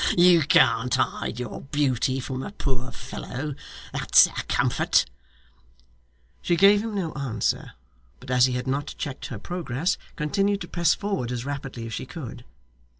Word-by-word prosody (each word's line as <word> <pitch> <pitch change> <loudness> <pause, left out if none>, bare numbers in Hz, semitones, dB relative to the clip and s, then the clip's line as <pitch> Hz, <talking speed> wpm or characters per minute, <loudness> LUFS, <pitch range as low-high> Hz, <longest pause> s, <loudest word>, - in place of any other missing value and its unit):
You 175 -1 +7
can't 125 -3 +4
hide 130 -2 -1
your 125 -3 -5
beauty 135 -2 0
from 130 0 -4
a 200 - -6
poor 130 -9 -3
fellow; 145 +3 -6 0.4
that's - - +6
a - - -6 0.2
comfort!' - - +2 1.4
She 175 - +1
gave 200 +4 +6
him 225 -2 -4
no 175 -5 -2
answer, 125 -7 -2 0.5
but 130 - -8
as 125 0 +5
he 130 - -2
had 125 0 -2
not 140 +2 -2
yet - - -29
checked 140 -4 -5
her 115 - -6
progress, 165 - -2 0.2
continued 195 +6 0
to 175 - -5
press 170 -2 +2
forward 195 - -2
as 120 0 -4
rapidly 135 -4 -5
as 115 - -6
she 130 - -5
could. 125 -6 -8
135 Hz, 160 wpm, -25 LUFS, 125-170 Hz, 1.4 s, You